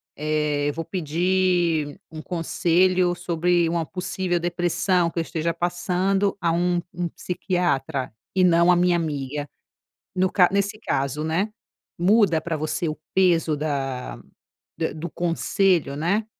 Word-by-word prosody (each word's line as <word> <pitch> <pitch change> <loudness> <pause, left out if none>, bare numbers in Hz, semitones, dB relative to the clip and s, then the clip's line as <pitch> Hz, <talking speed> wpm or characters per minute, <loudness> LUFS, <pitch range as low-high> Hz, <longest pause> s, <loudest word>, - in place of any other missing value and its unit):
eh, 150 -1 0
vou 165 +3 -4
pedir 175 -2 0
um 155 -1 -7
conselho 180 +1 +2
sobre 175 0 +1
uma 165 -1 -1
possível 180 +1 -2
depressão 175 0 +1
que - - -3
eu - - +2
esteja 165 0 -2
passando 180 +3 0
a 170 -2 +2
um 175 +1 +1
um 175 -1 -3
psiquiatra, 160 -8 -2 0.2
e 185 - +4
não 170 0 +5
a - - +5
minha 175 0 +3
amiga", 145 -3 -3 0.7
no 185 0 +2
ca 180 -3 +5
nesse 200 +2 0
caso, 140 - -1
né, 175 +7 -1 0.5
muda 185 -3 +4
pra 165 -2 -3
você 155 +2 -2
o 155 - -4 0.2
peso 170 -5 +3
da 135 -4 -3 0.8
do 170 +3 -5
conselho, 175 -2 +1
né. 180 +8 0
170 Hz, 130 wpm, -24 LUFS, 155-180 Hz, 0.8 s, não